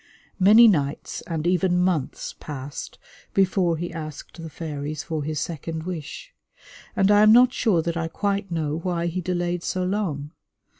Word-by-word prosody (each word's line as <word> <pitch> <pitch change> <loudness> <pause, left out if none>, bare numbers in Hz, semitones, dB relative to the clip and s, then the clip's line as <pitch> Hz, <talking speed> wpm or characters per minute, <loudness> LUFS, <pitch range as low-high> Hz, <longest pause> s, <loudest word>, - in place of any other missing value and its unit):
Many 215 +5 +8
nights 145 -8 0
and 160 -2 -3
even 180 0 +2
months 180 -6 -1
passed 140 -1 -7 0.4
before 185 -3 +2
he 175 +2 -5
asked 155 +1 -8
the 165 - -7
fairies 150 -1 -5
for 160 -3 -3
his 155 0 -2
second 160 0 -4
wish; 180 - -7 0.6
and 195 0 +3
I 205 0 +6
am 215 0 +7
not 250 +2 +6
sure 185 -9 +2
that 170 0 -2
I 165 -1 -1
quite 200 +3 -2
know 160 -2 -2
why 170 -1 -2
he 175 +2 -2
delayed 175 0 -1
so 185 +1 -2
long. 180 -7 -2
170 Hz, 160 wpm, -24 LUFS, 155-190 Hz, 0.6 s, Many